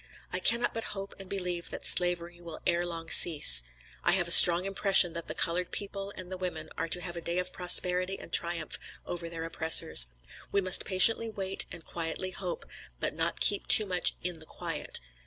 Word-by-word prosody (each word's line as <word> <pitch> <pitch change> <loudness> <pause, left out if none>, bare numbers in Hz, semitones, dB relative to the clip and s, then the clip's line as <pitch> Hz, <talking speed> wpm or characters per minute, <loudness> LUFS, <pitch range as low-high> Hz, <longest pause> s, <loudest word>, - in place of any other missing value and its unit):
I - - -1
cannot 235 +1 0
but 225 - -6
hope 195 0 -9
and 195 -1 -13
believe 180 -3 -5
that - - -8
slavery 175 -1 -1
will 165 -2 -11
ere 175 +1 -2
long 165 -1 -9
cease. 155 - +7 0.4
I - - +1
have 175 -2 -2
a - - -2
strong 175 +1 +9
impression 195 -3 +2
that 170 0 -9
the - - -8
colored 175 +1 -4
people 200 0 -5
and 185 0 -11
the 185 - -8
women 185 -1 -8
are 165 - -5
to 180 +2 -3
have 175 -1 -8
a 170 - -8
day 170 +1 -5
of 180 0 -4
prosperity 180 +1 +3
and - - -15
triumph 170 -2 -1 0.3
over 170 -1 -8
their 165 -1 -9
oppressors. 160 - +2 0.4
We 200 - 0
must 185 -1 +1
patiently 225 +4 +3
wait 195 -3 -2
and 165 - -13
quietly 170 +2 -7
hope; 180 -2 -8 0.3
but - - -4
not - - -4
keep 205 - 0
too 215 - +7
much 180 -2 +2
'in 175 -2 -6
the 155 - -17
quiet.' - - -5
180 Hz, 200 wpm, -27 LUFS, 170-190 Hz, 0.4 s, strong